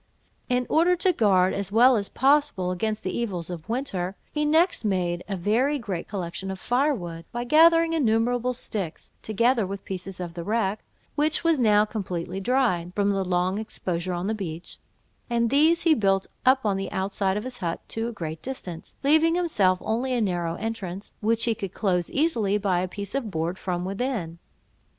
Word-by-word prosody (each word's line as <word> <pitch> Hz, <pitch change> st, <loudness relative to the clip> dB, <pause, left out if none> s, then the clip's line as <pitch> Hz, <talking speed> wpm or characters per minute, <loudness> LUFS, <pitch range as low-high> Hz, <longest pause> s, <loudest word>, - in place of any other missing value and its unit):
In 250 Hz, 0 st, +1 dB
order 345 Hz, +3 st, +3 dB
to 360 Hz, +1 st, +2 dB
guard, 190 Hz, -, +3 dB
as 200 Hz, -1 st, -3 dB
well 245 Hz, +4 st, +6 dB
as 200 Hz, -2 st, -2 dB
possible, 270 Hz, -9 st, +2 dB
against 215 Hz, +4 st, -2 dB
the 185 Hz, -, -3 dB
evils 180 Hz, -8 st, -3 dB
of 170 Hz, +2 st, -8 dB
winter, 200 Hz, -7 st, -2 dB, 0.2 s
he 300 Hz, 0 st, 0 dB
next 325 Hz, +2 st, +3 dB
made 180 Hz, -4 st, 0 dB
a 195 Hz, -, -1 dB
very 235 Hz, +11 st, +1 dB
great 200 Hz, -9 st, -5 dB
collection 190 Hz, -1 st, -4 dB
of 190 Hz, -1 st, -5 dB
firewood, 240 Hz, -, -1 dB
by 240 Hz, 0 st, -3 dB
gathering 330 Hz, +4 st, +5 dB
innumerable 245 Hz, -3 st, +1 dB
sticks, 200 Hz, -8 st, -5 dB
together 230 Hz, +2 st, +2 dB
with 195 Hz, +1 st, -6 dB
pieces 190 Hz, 0 st, -6 dB
of 175 Hz, -2 st, -5 dB
the 170 Hz, 0 st, -6 dB
wreck, 210 Hz, 0 st, -1 dB, 0.3 s
which 300 Hz, +2 st, +1 dB
was 330 Hz, -4 st, +3 dB
now 210 Hz, -3 st, +4 dB
completely 185 Hz, -4 st, -4 dB
dried, 195 Hz, -7 st, 0 dB
from 205 Hz, -1 st, +2 dB
long 185 Hz, 0 st, 0 dB
exposure 185 Hz, -4 st, -3 dB
on 175 Hz, +1 st, -3 dB
the 215 Hz, -, 0 dB
beach; 175 Hz, -5 st, -6 dB, 0.5 s
and 235 Hz, -1 st, +1 dB
these 315 Hz, +4 st, +4 dB
he 330 Hz, -, +5 dB
built 195 Hz, -7 st, +2 dB, 0.2 s
up 260 Hz, -1 st, +4 dB
on 200 Hz, -2 st, +1 dB
the 195 Hz, 0 st, -4 dB
outside 195 Hz, 0 st, -1 dB
of 210 Hz, -, -3 dB
his 255 Hz, -1 st, -7 dB
hut 170 Hz, -2 st, -2 dB
to 225 Hz, +1 st, -3 dB
a -, -, -3 dB
great 160 Hz, -7 st, -6 dB
distance, 185 Hz, -11 st, -7 dB
leaving 315 Hz, +4 st, +4 dB
himself 210 Hz, -, +2 dB
only 250 Hz, +4 st, -1 dB
a 245 Hz, -, +1 dB
narrow 175 Hz, -5 st, -1 dB
entrance, 200 Hz, -3 st, -5 dB
which 225 Hz, +1 st, +1 dB
he 230 Hz, -, +2 dB
could 195 Hz, -4 st, -6 dB
close 180 Hz, -5 st, 0 dB
easily 235 Hz, -10 st, +1 dB
by 195 Hz, -4 st, +1 dB
a 185 Hz, -, -1 dB
piece 200 Hz, +2 st, -6 dB
of 265 Hz, -5 st, -2 dB
board 170 Hz, +1 st, -2 dB
from 180 Hz, -1 st, -2 dB
within. 195 Hz, -5 st, -3 dB
210 Hz, 185 wpm, -25 LUFS, 185-250 Hz, 0.5 s, well